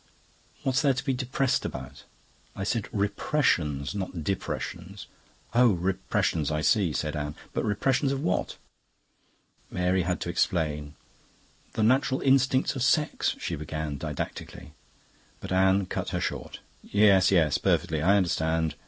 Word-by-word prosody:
"What's 135 Hz, -1 st, +2 dB
there 140 Hz, -3 st, +3 dB
to 130 Hz, -, -4 dB
be 135 Hz, -, +1 dB
depressed 130 Hz, +1 st, 0 dB
about?" 65 Hz, +1 st, -7 dB, 0.5 s
"I 95 Hz, -, -4 dB
said 110 Hz, +1 st, -1 dB
repressions, 100 Hz, -, 0 dB
not 95 Hz, -5 st, -4 dB
depressions." 95 Hz, +1 st, -4 dB, 0.5 s
"Oh, 120 Hz, -2 st, +5 dB
repressions; 85 Hz, -4 st, 0 dB
I 75 Hz, -1 st, -1 dB
see," 95 Hz, 0 st, +3 dB
said 75 Hz, +3 st, -2 dB
Anne. 75 Hz, 0 st, -4 dB, 0.2 s
"But -, -, -1 dB
repressions 135 Hz, +6 st, +1 dB
of 135 Hz, -, -1 dB
what?" 90 Hz, -, -1 dB, 1.1 s
Mary 90 Hz, +1 st, +1 dB
had 90 Hz, +1 st, -1 dB
to -, -, -3 dB
explain. 75 Hz, -4 st, -1 dB, 0.8 s
"The 110 Hz, -, 0 dB
natural 130 Hz, +3 st, +2 dB
instincts 130 Hz, 0 st, +3 dB
of 130 Hz, -, -3 dB
sex..." 140 Hz, +4 st, +1 dB
she -, -, -3 dB
began 75 Hz, -1 st, -4 dB
didactically. 75 Hz, -, -6 dB, 0.7 s
But -, -, -8 dB
Anne 95 Hz, +1 st, +3 dB
cut -, -, -4 dB
her -, -, -2 dB
short. -, -, -4 dB, 0.2 s
"Yes, 100 Hz, -3 st, +4 dB
yes. 80 Hz, -7 st, +3 dB
Perfectly. 80 Hz, -2 st, +1 dB
I 100 Hz, +5 st, +4 dB
understand. 80 Hz, -3 st, 0 dB
95 Hz, 135 wpm, -27 LUFS, 80-120 Hz, 1.1 s, Oh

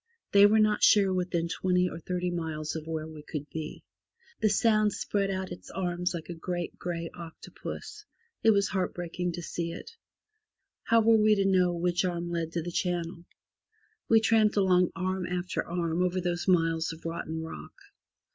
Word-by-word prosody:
They 200 Hz, 0 st, +8 dB
were 215 Hz, +2 st, +4 dB
not 215 Hz, -1 st, +3 dB
sure 195 Hz, -3 st, +5 dB
within 175 Hz, -2 st, -1 dB
twenty 180 Hz, +1 st, +1 dB
or 165 Hz, -, -6 dB
thirty 180 Hz, +1 st, -2 dB
miles 160 Hz, -3 st, -3 dB
of 160 Hz, 0 st, -6 dB
where 160 Hz, -1 st, -3 dB
we 155 Hz, -1 st, -10 dB
could 150 Hz, -1 st, -6 dB
be. 160 Hz, -1 st, -6 dB, 0.6 s
The 220 Hz, -, +3 dB
Sound 215 Hz, 0 st, +3 dB
spread 200 Hz, -1 st, -1 dB
out 190 Hz, -1 st, -3 dB
its 175 Hz, -, -9 dB
arms 180 Hz, -1 st, -2 dB
like 165 Hz, -, -6 dB
a 175 Hz, -, -5 dB
great 175 Hz, +1 st, -4 dB
grey 170 Hz, -1 st, -4 dB
octopus. 175 Hz, -, -8 dB, 0.4 s
It 225 Hz, -, +4 dB
was 200 Hz, -2 st, +3 dB
heart 185 Hz, -2 st, -1 dB
breaking 175 Hz, 0 st, -3 dB
to 175 Hz, 0 st, -6 dB
see 170 Hz, +1 st, -3 dB
it. -, -, -9 dB, 0.9 s
How 230 Hz, 0 st, +4 dB
were 225 Hz, 0 st, +5 dB
we 215 Hz, 0 st, +5 dB
to 195 Hz, -1 st, +1 dB
know 185 Hz, -2 st, +3 dB
which 175 Hz, +1 st, 0 dB
arm 175 Hz, -1 st, -2 dB
led 165 Hz, -1 st, -2 dB
to 170 Hz, -, -1 dB
the 175 Hz, -, -5 dB
channel? 170 Hz, -1 st, -2 dB, 0.8 s
We 225 Hz, -, +7 dB
tramped 220 Hz, -1 st, +3 dB
along 185 Hz, -3 st, +4 dB
arm 185 Hz, -1 st, -2 dB
after 180 Hz, 0 st, -2 dB
arm 170 Hz, -1 st, -1 dB
over 180 Hz, 0 st, +1 dB
those 175 Hz, 0 st, -2 dB
miles 165 Hz, -3 st, +2 dB
of 160 Hz, 0 st, -11 dB
rotten 160 Hz, -1 st, -4 dB
rock. 160 Hz, -, -9 dB
180 Hz, 180 wpm, -29 LUFS, 170-190 Hz, 0.9 s, They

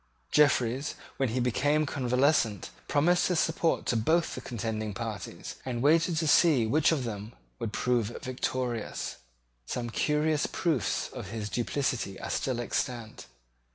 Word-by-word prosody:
Jeffreys, 135 Hz, -2 st, +3 dB, 0.2 s
when 135 Hz, -2 st, +1 dB
he 125 Hz, +3 st, -1 dB
became 145 Hz, +5 st, +2 dB
convalescent, 125 Hz, -, +1 dB, 0.2 s
promised 175 Hz, +5 st, +3 dB
his 180 Hz, -3 st, +1 dB
support 165 Hz, 0 st, +1 dB
to -, -, +1 dB
both 160 Hz, +10 st, +2 dB
the -, -, -6 dB
contending 110 Hz, -3 st, -3 dB
parties, 115 Hz, -3 st, -6 dB
and 120 Hz, -2 st, -3 dB
waited 165 Hz, +3 st, +4 dB
to 160 Hz, -, +1 dB
see 150 Hz, -6 st, +5 dB
which 150 Hz, +9 st, +3 dB
of 150 Hz, -5 st, 0 dB
them 110 Hz, -1 st, -5 dB, 0.3 s
would 110 Hz, -, -3 dB
prove 120 Hz, -1 st, +1 dB, 0.2 s
victorious. 125 Hz, -2 st, -3 dB, 0.5 s
Some 120 Hz, -1 st, -3 dB
curious 150 Hz, +3 st, +1 dB
proofs 160 Hz, -, 0 dB
of -, -, -7 dB
his 110 Hz, -2 st, -4 dB
duplicity 120 Hz, -5 st, -1 dB
are -, -, -5 dB
still 130 Hz, -3 st, -1 dB
extant. 120 Hz, -, -3 dB
125 Hz, 140 wpm, -29 LUFS, 115-150 Hz, 0.5 s, see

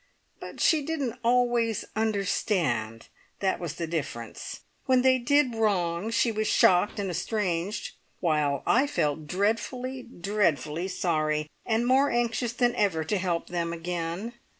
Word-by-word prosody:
But -, -, -9 dB
she 315 Hz, -2 st, +4 dB
didn't 275 Hz, -6 st, -3 dB
always 240 Hz, -2 st, +2 dB
understand, 180 Hz, -, 0 dB, 0.3 s
that 190 Hz, -1 st, 0 dB
was 165 Hz, -3 st, -4 dB
the 170 Hz, -, -3 dB
difference. 140 Hz, -8 st, -5 dB, 0.3 s
When 255 Hz, -1 st, +4 dB
they 260 Hz, 0 st, +5 dB
did 270 Hz, +1 st, +3 dB
wrong 195 Hz, -4 st, 0 dB
she 230 Hz, +1 st, +2 dB
was 215 Hz, 0 st, -1 dB
shocked 180 Hz, +4 st, +4 dB
and 195 Hz, -3 st, -2 dB
estranged, 185 Hz, 0 st, -2 dB, 0.3 s
while 150 Hz, -5 st, +1 dB
I 265 Hz, +4 st, +3 dB
felt 155 Hz, -, -1 dB
dreadfully, 230 Hz, -, -1 dB
dreadfully 185 Hz, -, -1 dB
sorry, 155 Hz, -4 st, -1 dB, 0.2 s
and 225 Hz, +1 st, +1 dB
more 265 Hz, +3 st, +4 dB
anxious 240 Hz, 0 st, 0 dB
than 240 Hz, 0 st, +2 dB
ever 185 Hz, -6 st, +1 dB
to 200 Hz, +6 st, -1 dB
help 175 Hz, -2 st, -2 dB
them 170 Hz, -1 st, -1 dB
again. 170 Hz, +5 st, -4 dB
200 Hz, 135 wpm, -27 LUFS, 170-240 Hz, 0.3 s, they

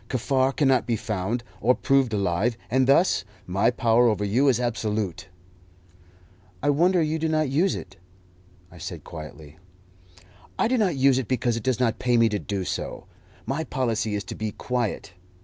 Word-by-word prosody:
Kaffar 130 Hz, +1 st, +1 dB
cannot 135 Hz, -3 st, +2 dB
be 120 Hz, -, +1 dB
found, 110 Hz, +2 st, -3 dB, 0.2 s
or 125 Hz, +5 st, +3 dB
proved 135 Hz, -3 st, +2 dB
alive, 100 Hz, +3 st, 0 dB
and 130 Hz, +1 st, +3 dB
thus 140 Hz, -, +4 dB, 0.2 s
my 100 Hz, +5 st, +2 dB
power 120 Hz, -1 st, +3 dB
over 105 Hz, -2 st, +1 dB
you 120 Hz, +8 st, +2 dB
is 125 Hz, -3 st, +3 dB
absolute." 110 Hz, -6 st, -2 dB, 1.4 s
"I 145 Hz, -, +3 dB
wonder 175 Hz, +4 st, +3 dB
you 155 Hz, +1 st, -1 dB
do 160 Hz, 0 st, 0 dB
not 155 Hz, -2 st, +1 dB
use 175 Hz, +7 st, +2 dB
it," 95 Hz, +1 st, -9 dB, 0.7 s
I 90 Hz, -, -14 dB
said -, -, -7 dB
quietly. 75 Hz, -1 st, -10 dB, 1.0 s
"I -, -, +2 dB
do 255 Hz, +1 st, +1 dB
not 190 Hz, -7 st, +1 dB
use 135 Hz, -1 st, +4 dB
it 125 Hz, -, -4 dB
because 125 Hz, -2 st, 0 dB
it 115 Hz, -, -3 dB
does 130 Hz, +2 st, 0 dB
not 120 Hz, -3 st, +1 dB
pay 125 Hz, -1 st, +2 dB
me 115 Hz, -1 st, +4 dB
to 105 Hz, -1 st, -2 dB
do 95 Hz, -2 st, -4 dB
so. -, -, -4 dB, 0.4 s
My 135 Hz, +6 st, -2 dB
policy 115 Hz, -7 st, -1 dB
is 100 Hz, -, -3 dB
to 95 Hz, -, -7 dB
be 110 Hz, -1 st, -4 dB
quiet. 120 Hz, -7 st, -3 dB
120 Hz, 175 wpm, -25 LUFS, 105-135 Hz, 1.4 s, thus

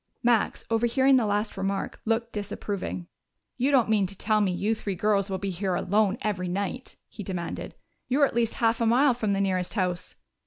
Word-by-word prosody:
Max, 235 Hz, -3 st, +2 dB
overhearing 240 Hz, +4 st, +4 dB
the 230 Hz, -4 st, +2 dB
last 210 Hz, +1 st, -1 dB
remark, 195 Hz, 0 st, -3 dB
looked 230 Hz, +1 st, 0 dB
disapproving. 200 Hz, -3 st, -4 dB, 0.5 s
"You 255 Hz, +3 st, +2 dB
don't 265 Hz, -5 st, +4 dB
mean 210 Hz, -3 st, +2 dB
to 195 Hz, +1 st, -10 dB
tell 215 Hz, -1 st, +2 dB
me 195 Hz, -3 st, +2 dB
you 205 Hz, +5 st, 0 dB
three 205 Hz, -3 st, -4 dB
girls 200 Hz, +1 st, +1 dB
will 190 Hz, -, -1 dB
be 195 Hz, +1 st, -3 dB
here 185 Hz, +1 st, -1 dB
alone 205 Hz, +3 st, +1 dB
every 185 Hz, -4 st, -1 dB
night?" 200 Hz, +8 st, -3 dB
he 215 Hz, -, -9 dB
demanded. 180 Hz, -4 st, -5 dB, 0.3 s
"You're 280 Hz, +3 st, +4 dB
at -, -, -3 dB
least 230 Hz, -1 st, +1 dB
half 230 Hz, 0 st, +1 dB
a 230 Hz, -, +3 dB
mile 255 Hz, +4 st, +5 dB
from 220 Hz, -4 st, -1 dB
the 195 Hz, -, 0 dB
nearest 185 Hz, -1 st, 0 dB
house." 180 Hz, -3 st, -1 dB
210 Hz, 195 wpm, -27 LUFS, 195-230 Hz, 0.5 s, mile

